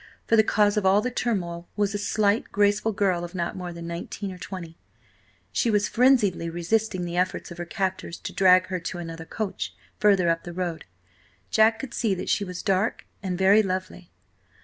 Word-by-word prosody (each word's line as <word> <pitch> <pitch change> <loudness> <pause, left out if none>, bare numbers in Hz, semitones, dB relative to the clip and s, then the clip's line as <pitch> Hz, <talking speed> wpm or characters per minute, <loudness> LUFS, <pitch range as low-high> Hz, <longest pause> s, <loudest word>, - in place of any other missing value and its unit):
For 230 - +3
the 220 - +6
cause 210 0 +2
of 205 - +1
all 195 +2 +5
the 250 +4 -2
turmoil 175 -9 -2
was 205 -1 0
a 205 - -2
slight, 205 +1 +1
graceful 205 +2 +2
girl 190 -4 +1
of 175 +2 -7
not 170 -1 -2
more 180 -1 -5
than 170 0 -8
nineteen 170 +4 -5
or 180 - -10
twenty. 175 -3 -8 0.7
She 235 - +1
was 205 -2 +2
frenziedly 225 -10 +3
resisting 180 +2 -1
the 175 0 -4
efforts 180 0 -1
of 170 - -9
her 175 - -3
captors 185 -1 -3
to - - -6
drag 185 -1 +5
her 185 -1 -2
to 175 +2 -5
another 165 -1 -7
coach, 205 +4 -4 0.2
further 195 -4 +4
up 165 0 0
the 175 - -7
road. 175 -2 -3 0.7
Jack 220 +1 +5
could 240 +1 -7
see 210 -5 0
that 180 - -5
she 205 - +2
was 180 -2 -6
dark 195 +2 0 0.2
and 185 -3 -3
very 195 +3 +6
lovely. 185 -2 -4
190 Hz, 195 wpm, -25 LUFS, 175-210 Hz, 0.7 s, the